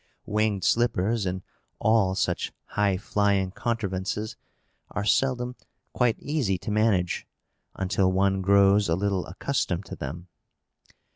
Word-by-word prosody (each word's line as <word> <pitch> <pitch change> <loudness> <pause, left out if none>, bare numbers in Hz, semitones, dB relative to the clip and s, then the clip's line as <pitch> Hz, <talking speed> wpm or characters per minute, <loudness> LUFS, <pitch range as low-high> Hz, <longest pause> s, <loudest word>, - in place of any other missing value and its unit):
Winged 105 -2 0
slippers, 115 -3 +1
and 90 +1 -3 0.3
all 105 -4 +3
such - - -1 0.2
high 100 -2 +1
flying 100 -1 +1
contrivances, 105 -2 -2 0.5
are 105 0 -3
seldom 125 +1 +1 0.4
quite 125 -3 +2
easy 135 -10 0
to 105 - -5
manage 105 -5 +1 0.5
until 95 0 +1
one 95 0 +2
grows 100 0 +4
a 80 - +3
little 95 -1 -1
accustomed 95 - -2
to - - -7
them. 85 +6 -6
100 Hz, 120 wpm, -26 LUFS, 95-110 Hz, 0.5 s, grows